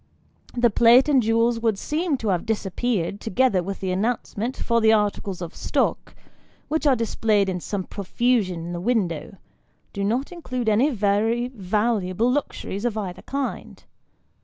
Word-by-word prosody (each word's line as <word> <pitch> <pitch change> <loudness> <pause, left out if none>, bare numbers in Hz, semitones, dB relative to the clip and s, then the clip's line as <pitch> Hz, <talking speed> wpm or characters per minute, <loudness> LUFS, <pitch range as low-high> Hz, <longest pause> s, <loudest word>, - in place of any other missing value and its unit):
The 240 -1 +4
plate 235 +5 +6
and 280 -4 +4
jewels 230 +1 +2
would 225 -3 +1
seem 310 - -1
to 225 -4 -3
have 180 -3 -1
disappeared, 205 -2 -1
together 225 -2 +2
with 195 +2 -6
the 190 -1 -1
announcement, 225 +4 -2
for 235 -1 +1
the 220 0 +5
articles 205 -3 0
of 170 - -7
stock, - - -1 0.5
which 310 0 0
are 270 - +5
displayed 220 -3 +1
in 185 -1 -2
some 195 +2 -3
profusion 200 -3 -1
in 175 - -5
the 175 - -4
window, 190 -6 -1 0.6
do 200 - -3
not 240 - -1
include 255 -9 -3
any 230 +7 +3
very 225 +1 +1
valuable 215 0 0
luxuries 240 -7 -3
of 235 -3 -1
either 190 -4 -5
kind. 275 -1 -5
220 Hz, 155 wpm, -23 LUFS, 195-245 Hz, 0.6 s, plate